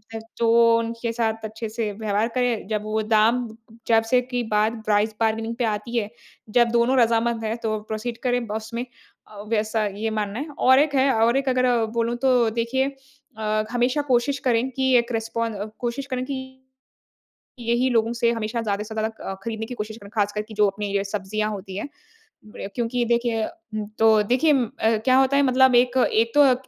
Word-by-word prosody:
अ, 225 Hz, -, -3 dB, 0.2 s
तो 230 Hz, 0 st, +4 dB
उनके 230 Hz, 0 st, -3 dB
साथ 225 Hz, -1 st, -1 dB
अच्छे 220 Hz, +1 st, -6 dB
से 220 Hz, -1 st, -3 dB
व्यवहार 215 Hz, +1 st, -1 dB
करे 245 Hz, -2 st, +2 dB
जब 215 Hz, -1 st, -1 dB
वो 215 Hz, +1 st, -1 dB
दाम 225 Hz, +3 st, +2 dB, 0.4 s
जब 225 Hz, -1 st, +4 dB
से 250 Hz, -1 st, +4 dB
की 245 Hz, -1 st, -3 dB
बात 220 Hz, +2 st, +1 dB
प्राइस 215 Hz, +1 st, +1 dB
बार्गेनिंग 225 Hz, +1 st, 0 dB
पे 245 Hz, -, -2 dB
आती 220 Hz, +2 st, -2 dB
है 210 Hz, -2 st, -1 dB, 0.5 s
जब 240 Hz, -, +5 dB
दोनों 240 Hz, +2 st, +2 dB
रज़ामंद 230 Hz, 0 st, +2 dB
है 220 Hz, +1 st, -1 dB
तो 215 Hz, -1 st, -1 dB
प्रोसीड 225 Hz, +2 st, -4 dB
करें 245 Hz, -1 st, +1 dB
ब 210 Hz, -, -7 dB
उसमें 230 Hz, +3 st, -4 dB, 0.4 s
अ, 205 Hz, -1 st, -11 dB
वैसा 215 Hz, 0 st, 0 dB
ये 205 Hz, +2 st, -3 dB
मानना 210 Hz, 0 st, -3 dB
है 295 Hz, -, -4 dB
और 260 Hz, +1 st, +6 dB
एक 285 Hz, -1 st, +2 dB
है 270 Hz, +1 st, +4 dB
और 230 Hz, +3 st, +3 dB
एक 270 Hz, -1 st, 0 dB
अगर 255 Hz, 0 st, +2 dB, 0.3 s
बोलूँ 230 Hz, +1 st, +1 dB
तो 245 Hz, -3 st, +4 dB
देखिए 235 Hz, +4 st, 0 dB, 0.5 s
अ, 215 Hz, 0 st, 0 dB
हमेशा 250 Hz, +4 st, +1 dB
कोशिश 260 Hz, +2 st, +1 dB
करें 245 Hz, +1 st, +2 dB
कि 260 Hz, 0 st, +1 dB
एक 235 Hz, +1 st, 0 dB
रिस्पॉन 225 Hz, 0 st, -2 dB
अ, 205 Hz, 0 st, -4 dB
कोशिश 245 Hz, +3 st, -3 dB
करें 255 Hz, -2 st, -3 dB
कि 260 Hz, -1 st, -6 dB, 1.0 s
यही 240 Hz, +2 st, +1 dB
लोगों 230 Hz, -2 st, +2 dB
से 235 Hz, 0 st, +1 dB
हमेशा 230 Hz, +1 st, -2 dB
ज़्यादा 205 Hz, -2 st, -2 dB
से 220 Hz, +1 st, -9 dB
ज़्यादा 220 Hz, 0 st, 0 dB, 0.2 s
अ, -, -, -3 dB
खरीदने 225 Hz, -1 st, -4 dB
की 250 Hz, -, -7 dB
कोशिश 215 Hz, 0 st, -6 dB
करें 200 Hz, -2 st, -13 dB
ख़ासकर 205 Hz, 0 st, 0 dB
कि 215 Hz, +1 st, -12 dB
जो 210 Hz, -1 st, +3 dB
अपनी 200 Hz, 0 st, -3 dB
अ, 195 Hz, -, -1 dB
सब्जियाँ 210 Hz, +2 st, -2 dB
होती 195 Hz, -2 st, -7 dB
हैं 245 Hz, -, -5 dB, 0.6 s
बढ़िया 210 Hz, -2 st, -8 dB
क्योंकि 240 Hz, +1 st, -1 dB
देखिए 235 Hz, -1 st, 0 dB
उम, 220 Hz, -11 st, -7 dB
तो 220 Hz, -1 st, +5 dB
देखिए 260 Hz, +8 st, +3 dB, 0.5 s
क्या 255 Hz, -1 st, +4 dB
होता 270 Hz, +1 st, +3 dB
है 280 Hz, -, +4 dB
मतलब 260 Hz, -1 st, +4 dB
एक 245 Hz, +1 st, +3 dB, 0.2 s
एक 230 Hz, +1 st, +2 dB
तो 290 Hz, -, +7 dB
अ, 265 Hz, -3 st, +5 dB
230 Hz, 200 wpm, -23 LUFS, 215-245 Hz, 1.0 s, तो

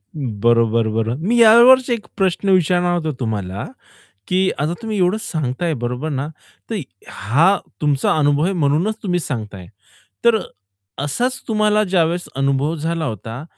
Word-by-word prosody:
बरोबर, 115 Hz, -3 st, +1 dB
बरोबर, 115 Hz, +2 st, -1 dB
मी 205 Hz, +10 st, 0 dB
यावरच 245 Hz, +3 st, +7 dB
एक 230 Hz, -3 st, -2 dB
प्रश्न 195 Hz, 0 st, 0 dB
विचारणार 180 Hz, -1 st, +2 dB
होतो 160 Hz, -2 st, -2 dB
तुम्हाला, 100 Hz, -5 st, -3 dB, 0.6 s
की 190 Hz, +1 st, +1 dB
आता 150 Hz, +4 st, -1 dB
तुम्ही 220 Hz, -2 st, -3 dB
एवढंच 185 Hz, +4 st, +1 dB
सांगताये 155 Hz, +2 st, -2 dB
बरोबर 125 Hz, +5 st, -3 dB
ना? 140 Hz, -1 st, -2 dB, 0.4 s
तर 215 Hz, -4 st, -2 dB, 0.3 s
हा 140 Hz, -, +1 dB, 0.3 s
तुमचा 145 Hz, -1 st, +1 dB
अनुभव 145 Hz, +1 st, +2 dB
आहे 190 Hz, -, 0 dB
म्हणूनच 170 Hz, +5 st, 0 dB
तुम्ही 180 Hz, -3 st, -1 dB
सांगताये. 105 Hz, -, -6 dB, 0.6 s
तर 235 Hz, -1 st, +5 dB
अ, -, -, -6 dB, 0.6 s
असाच 245 Hz, -, -1 dB
तुम्हाला 215 Hz, -1 st, +2 dB
ज्यावेळेस 175 Hz, -2 st, 0 dB
अनुभव 140 Hz, +3 st, 0 dB
झाला 165 Hz, +1 st, -2 dB
होता, 115 Hz, -, -6 dB
160 Hz, 140 wpm, -19 LUFS, 125-190 Hz, 0.6 s, यावरच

